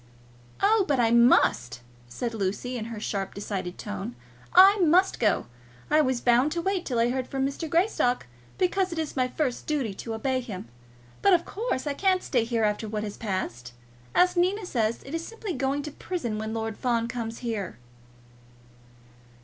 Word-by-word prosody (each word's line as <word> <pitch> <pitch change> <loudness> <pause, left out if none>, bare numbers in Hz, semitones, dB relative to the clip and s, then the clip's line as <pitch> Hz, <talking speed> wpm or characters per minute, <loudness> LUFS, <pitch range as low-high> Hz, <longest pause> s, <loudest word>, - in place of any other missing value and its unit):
"Oh, 420 +1 +5
but 280 -3 +1
I 230 -1 +3
must," 235 - +4 0.3
said 235 - -4
Lucy 210 +4 -2
in 225 -3 -4
her 230 -2 -6
sharp, 195 -2 -3
decided 195 -3 -4
tone. 100 +5 -5 0.4
"I 390 +3 +8
must 360 +2 +4
go. 215 -3 +2 0.5
I 310 - +6
was 260 -4 0
bound 245 +4 +4
to 340 - -1
wait 385 -1 -1
till 245 - -1
I 235 +1 +3
heard 260 0 -2
from 270 -1 -1
Mr. 280 +4 -3
Greystock, 330 - +1 0.3
because 370 0 +1
it 335 - -5
is 315 -2 -3
my 255 -2 +2
first 255 -1 -2
duty 275 -9 -1
to 225 +3 -5
obey 260 +3 0
him. 210 - -7 0.5
But 400 - +5
of 340 -1 +3
course 425 - -3
I 290 - -1
cannot 370 +4 +1
stay 240 -4 +1
here 230 -1 0
after 210 +1 0
what 210 0 -3
has 205 -1 -5
passed. 125 - -4 0.4
As 360 0 +4
Nina 370 +4 +1
says, 230 -7 -1
it 270 - -9
is 330 0 -2
simply 440 -1 -6
going 275 +1 -1
to 300 - -6
prison 245 -10 -4
when 220 0 -4
Lord 225 -1 -3
Fawn 235 -2 +1
comes 230 -1 -4
here." 200 - -3
250 Hz, 180 wpm, -27 LUFS, 220-330 Hz, 0.5 s, I